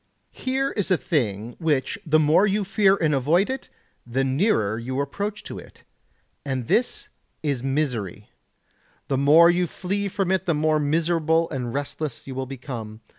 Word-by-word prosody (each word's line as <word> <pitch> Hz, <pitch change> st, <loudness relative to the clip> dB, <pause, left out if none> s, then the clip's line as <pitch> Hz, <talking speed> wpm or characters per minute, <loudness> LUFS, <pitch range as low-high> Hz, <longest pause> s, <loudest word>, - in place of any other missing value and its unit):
Here 265 Hz, +1 st, -1 dB
is 205 Hz, -3 st, -2 dB
a 185 Hz, -, +4 dB
thing 120 Hz, -, -1 dB
which 160 Hz, +4 st, 0 dB
the 155 Hz, -3 st, +3 dB
more 155 Hz, +6 st, +4 dB
you 205 Hz, +1 st, +1 dB
fear 195 Hz, 0 st, +3 dB
and 160 Hz, -6 st, +1 dB
avoid 165 Hz, -, +2 dB
it 265 Hz, 0 st, -6 dB, 0.3 s
the 125 Hz, +3 st, -1 dB
nearer 130 Hz, -, +1 dB
you 130 Hz, +3 st, -3 dB
approach 205 Hz, +9 st, -3 dB
to -, -, -7 dB
it, -, -, -16 dB, 0.6 s
and 130 Hz, -4 st, -3 dB
this 245 Hz, -, 0 dB, 0.3 s
is 140 Hz, -5 st, -1 dB
misery; 125 Hz, -, -2 dB, 0.8 s
the 135 Hz, -, +1 dB
more 160 Hz, +5 st, +7 dB
you 175 Hz, 0 st, +1 dB
flee 200 Hz, +4 st, -3 dB
from 190 Hz, -1 st, -1 dB
it 190 Hz, 0 st, 0 dB
the 170 Hz, -, +2 dB
more 155 Hz, +1 st, +2 dB
miserable 165 Hz, +2 st, +1 dB
and 125 Hz, -4 st, -3 dB
restless 145 Hz, +1 st, -4 dB
you 135 Hz, -, -6 dB
will 130 Hz, 0 st, -4 dB
become. 120 Hz, -5 st, -7 dB
155 Hz, 165 wpm, -24 LUFS, 130-185 Hz, 0.8 s, more